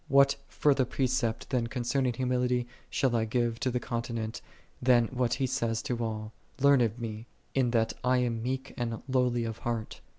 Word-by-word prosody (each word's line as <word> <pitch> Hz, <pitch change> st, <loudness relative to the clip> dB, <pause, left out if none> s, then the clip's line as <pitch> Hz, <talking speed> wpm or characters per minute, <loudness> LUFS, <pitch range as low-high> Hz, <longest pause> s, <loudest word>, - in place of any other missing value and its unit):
What 140 Hz, 0 st, +5 dB
further 140 Hz, -3 st, +3 dB
precept 130 Hz, -2 st, -1 dB
then 120 Hz, -3 st, +1 dB
concerning 125 Hz, +1 st, 0 dB
humility 125 Hz, 0 st, +1 dB, 0.2 s
shall 130 Hz, -4 st, +1 dB
I 110 Hz, -1 st, +2 dB
give 115 Hz, 0 st, 0 dB
to 130 Hz, -, 0 dB
the 125 Hz, 0 st, 0 dB
continent, 115 Hz, -2 st, -3 dB, 0.4 s
than 120 Hz, -2 st, +5 dB
what 125 Hz, -2 st, 0 dB
He 135 Hz, -, 0 dB
saith 120 Hz, -3 st, -1 dB
to 120 Hz, -1 st, -2 dB
all, 110 Hz, -1 st, -3 dB
" -, -, -29 dB
Learn 140 Hz, -1 st, +6 dB
of 115 Hz, -1 st, +1 dB
Me, 115 Hz, -1 st, -5 dB, 0.3 s
in 130 Hz, -3 st, +2 dB
that 115 Hz, -1 st, +1 dB
I 125 Hz, 0 st, +3 dB
am 120 Hz, -2 st, 0 dB
meek 130 Hz, +2 st, -3 dB
and 115 Hz, -2 st, -3 dB
lowly 125 Hz, -2 st, +2 dB
of 115 Hz, -1 st, -4 dB
heart 115 Hz, -2 st, -3 dB
120 Hz, 185 wpm, -30 LUFS, 115-130 Hz, 0.4 s, Learn